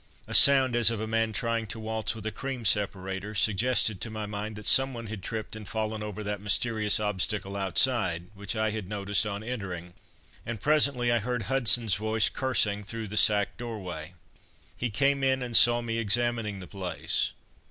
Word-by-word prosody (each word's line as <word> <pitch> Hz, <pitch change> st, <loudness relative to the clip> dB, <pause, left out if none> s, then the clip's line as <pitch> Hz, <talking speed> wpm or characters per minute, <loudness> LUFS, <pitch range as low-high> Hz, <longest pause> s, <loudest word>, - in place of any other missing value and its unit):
A -, -, -8 dB
sound 135 Hz, -3 st, +7 dB
as 120 Hz, -2 st, +5 dB
of 115 Hz, -2 st, -2 dB
a 110 Hz, -, -3 dB
man 115 Hz, 0 st, 0 dB
trying 115 Hz, 0 st, -2 dB
to 110 Hz, +2 st, -6 dB
waltz 110 Hz, 0 st, -3 dB
with 110 Hz, -1 st, -9 dB
a 110 Hz, -, -2 dB
cream 130 Hz, 0 st, -6 dB
separator, 100 Hz, 0 st, -2 dB
suggested 110 Hz, -1 st, +1 dB
to 115 Hz, -, -2 dB
my 110 Hz, -1 st, -5 dB
mind 105 Hz, +1 st, -6 dB
that 105 Hz, 0 st, -10 dB
someone 130 Hz, -2 st, +3 dB
had 110 Hz, -2 st, -7 dB
tripped 110 Hz, +2 st, -6 dB
and 110 Hz, -2 st, -9 dB
fallen 110 Hz, +1 st, -3 dB
over 105 Hz, 0 st, -6 dB
that 105 Hz, -1 st, -4 dB
mysterious 105 Hz, 0 st, +1 dB
obstacle 100 Hz, -1 st, -2 dB
outside, 95 Hz, -2 st, +1 dB
which 100 Hz, +2 st, -5 dB
I 110 Hz, 0 st, 0 dB
had 105 Hz, -3 st, -6 dB
noticed 100 Hz, 0 st, 0 dB
on 100 Hz, 0 st, -5 dB
entering, 95 Hz, -7 st, -6 dB, 0.5 s
and 115 Hz, -2 st, -6 dB
presently 140 Hz, -3 st, +2 dB
I 120 Hz, -, +2 dB
heard 120 Hz, +1 st, -3 dB
Hudson's 120 Hz, -4 st, +3 dB
voice 110 Hz, +1 st, +1 dB
cursing 110 Hz, -6 st, 0 dB
through 110 Hz, 0 st, -6 dB
the 105 Hz, -, -6 dB
sack 105 Hz, -1 st, +3 dB
doorway. 90 Hz, -8 st, -7 dB, 0.6 s
He 125 Hz, -, -2 dB
came 140 Hz, +6 st, +1 dB
in 130 Hz, -1 st, +1 dB
and 120 Hz, -2 st, -4 dB
saw 120 Hz, +1 st, +7 dB
me 115 Hz, -1 st, -3 dB
examining 115 Hz, -2 st, 0 dB
the -, -, -8 dB
place. 95 Hz, -2 st, -3 dB
110 Hz, 185 wpm, -27 LUFS, 100-120 Hz, 0.6 s, sound